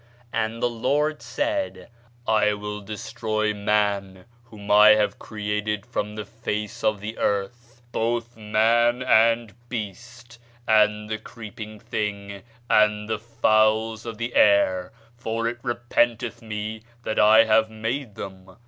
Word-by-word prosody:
And 115 +1 -2
the - - +4
Lord 145 +6 0
said, 295 -1 -3 0.4
I 105 -2 +3
will 105 0 -6
destroy 110 +1 -2
man 100 -2 -1 0.2
whom 105 -4 -8
I 105 +1 +8
have 105 -1 0
created 105 -1 -3
from 105 0 -4
the 105 -1 -5
face 115 +1 -5
of 105 -2 +1
the 110 +2 -6
earth; 120 +4 -3
both 120 +1 -2
man, 115 +3 +2
and 115 -2 +3 0.2
beast, 120 +2 -7 0.3
and 105 -1 +3
the 110 0 -3
creeping 110 -1 -9
thing, 100 -3 -4 0.3
and 105 -1 +3
the 110 -1 -2
fowls 110 0 +1
of 115 -2 -6
the 115 +2 -4
air; 95 -3 +3 0.3
for 115 0 -2
it 120 0 -4
repenteth 120 -1 0
me 110 0 -5 0.2
that 110 - -1
I 110 +1 +7
have 110 0 +3
made 110 +1 -4
them. 95 -1 -9
110 Hz, 130 wpm, -24 LUFS, 105-115 Hz, 0.4 s, I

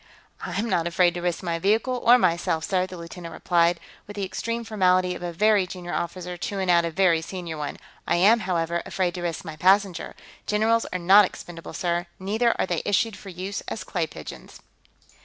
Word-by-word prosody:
"I 180 0 -4
am 220 +3 -1
not 170 -6 +1
afraid 175 0 +3
to 175 - -5
risk 175 0 -2
my 170 -2 -2
vehicle, 220 +7 +1
or 245 +2 +7
myself, 165 -6 +1
sir," 185 0 0
the 185 - -9
lieutenant 170 0 -9
replied, 170 -1 +2 0.3
with 205 - -9
the 200 - -3
extreme 230 +5 -3
formality 185 -4 +2
of 180 - -8
a 175 -1 -3
very 205 +2 +3
junior 175 -1 -7
officer 180 +1 -4
chewing 190 +1 -1
out 170 -1 +4
a - - -1
very 170 -1 +3
senior 170 -1 -6
one. 150 -1 -5 0.3
"I - - +2
am, 205 +7 +5
however, 170 -3 -1
afraid 185 -2 -1
to 180 - -6
risk 170 0 -3
my 160 -2 -7
passenger. 190 +1 +2 0.3
Generals 220 +2 +2
are - - -1
not 195 +4 +6
expendable, 170 -2 -9
sir; 175 0 -1
neither 220 +5 +1
are - - +2
they 175 -3 -1
issued 205 +2 +1
for 200 0 -11
use 185 +3 -5
as 225 - -4
clay 170 -4 -2
pigeons." 75 - -10
180 Hz, 200 wpm, -25 LUFS, 170-200 Hz, 0.3 s, or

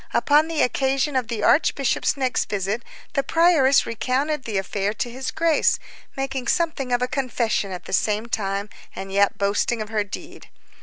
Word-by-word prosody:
Upon 300 +2 +4
the 325 -2 +1
occasion 270 +2 0
of 255 -3 +1
the 225 -3 -3
archbishop's 285 -2 +2
next 260 -2 0
visit, 200 +3 -1 0.3
the 275 - +2
prioress 310 -4 +4
recounted 265 +5 -1
the 215 -3 -2
affair 195 +1 -1
to 240 - -3
his 260 +2 -4
Grace, 325 -1 +2 0.4
making 270 -2 -3
something 315 -6 0
of 245 0 +2
a - - +1
confession 245 -7 -1
at 180 - -7
the - - -7
same 210 +3 +1
time, 200 -3 -2 0.3
and 195 0 -6
yet 200 +1 +2
boasting 200 +4 0
of 215 -1 -5
her 215 -2 0
deed. 200 - -9
250 Hz, 170 wpm, -23 LUFS, 210-275 Hz, 0.4 s, Upon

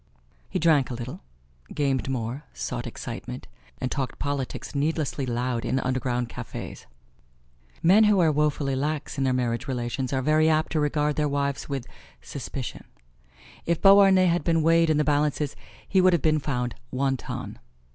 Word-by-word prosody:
He - - -2
drank 155 -5 +3
a 125 - -4
little, 120 +2 -7 0.5
gamed 135 -3 0
more, 125 +2 -3
sought 65 -1 -4
excitement, - - -7 0.3
and 130 - -2
talked 135 -4 -3
politics 140 -2 -4
needlessly 145 -2 -1
loud 120 0 -1
in 130 +2 0
underground 125 -2 -1
cafes. - - -8 1.0
Men 200 +6 +6
who 210 -2 +4
are 165 -3 +4
woefully 145 -2 0
lax 145 +1 -2
in 135 - +1
their 130 - +2
marriage 125 +1 -1
relations 125 0 -2
are 130 -1 0
very 155 +2 +4
apt 155 0 +1
to 160 - +1
regard 150 0 0
their 150 -1 +1
wives 140 0 -2
with 135 -3 -3 0.3
suspicion. 130 - -6 0.8
If 170 -1 +1
Beauharnais 195 -1 +7
had 175 0 +2
been 165 -2 +2
weighed 165 0 +4
in 155 - +3
the 150 - +3
balances 150 -1 0 0.3
he 190 - +3
would 185 0 +5
have 170 - +2
been 155 -1 +3
found 125 -4 -2 0.2
wanton. 135 0 -3
140 Hz, 160 wpm, -26 LUFS, 130-155 Hz, 1.0 s, Beauharnais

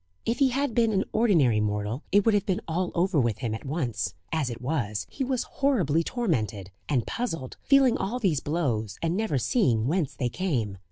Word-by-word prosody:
If 230 +1 0
he 275 -2 +5
had 275 0 -1
been 230 -1 +3
an 195 0 +2
ordinary 165 - +3
mortal 105 +4 -1
it 205 0 +4
would 225 - +4
have 205 -1 +1
been 185 -2 0
all 175 +2 -1
over 175 -2 +2
with 120 -5 +1
him 120 -4 -3
at 110 - -6
once; 135 - -2 0.2
as 155 -5 0
it 120 -1 -6
was, 120 -6 -2
he 275 - -3
was 255 -1 0
horribly 180 - +1
tormented, 110 - -2 0.2
and 125 -6 +1
puzzled 165 - -4
feeling 270 -3 +4
all 220 +6 -2
these 185 - +1
blows, 120 - -2
and 165 +1 +1
never 210 -9 0
seeing 120 - +2
whence 155 +1 0
they 125 - -1
came. 120 - -2
160 Hz, 200 wpm, -27 LUFS, -, 0.2 s, he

